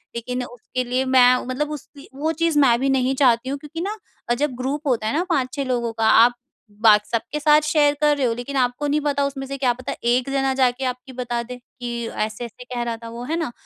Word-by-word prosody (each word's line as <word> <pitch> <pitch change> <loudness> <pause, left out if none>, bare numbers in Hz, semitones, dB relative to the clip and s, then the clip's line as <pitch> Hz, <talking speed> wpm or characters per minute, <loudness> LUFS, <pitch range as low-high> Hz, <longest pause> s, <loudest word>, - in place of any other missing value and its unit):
लेकिन 250 +2 -3
उसके 245 +1 -5
लिए 250 +2 -1
मैं 250 -1 +5
मतलब 290 +4 -2
उसकी 290 -1 -10
वो 310 +4 -1
चीज़ 325 -1 +1
मैं 245 -4 +4
भी 270 +1 +1
नहीं 265 0 +1
चाहती 255 -2 +3
हूँ, 280 - -2
क्योंकि 310 +3 -7
ना 415 +4 -3 0.3
अ, - - +4
जब 260 +1 -1
ग्रुप 280 +4 -3
होता 225 -4 +1
है - - -1
ना 350 - +1
5-6 275 -3 0
लोगों 240 -2 -1
का, 225 0 -1
आप 235 +2 +6 0.5
बात 210 -2 +6
सबके 235 +6 -2
साथ 300 0 +5
शेयर 300 -1 +3
कर 295 -1 +4
रहे 270 - +1
हो, 230 - 0
लेकिन 245 +4 -6
आपको 250 +3 0
नहीं 295 +1 +1
पता 285 -1 0
उसमें 270 -1 -4
से 275 +1 -5
क्या 260 -2 +2
पता 255 +1 -6
एक 245 +2 +2
जना 270 -1 +1
जाके 260 0 +1
आपकी 255 +1 -5
बता 240 -1 -2
दे 250 +1 -8
कि, 240 -2 -6
"ऐसे-ऐसे 225 +3 -5
कह 245 -1 -5
रहा 235 -1 -3
था 230 - -7
वो।" 235 +1 -7
है 310 +5 -2
ना? 315 -7 -2
255 Hz, 235 wpm, -22 LUFS, 245-285 Hz, 0.5 s, आप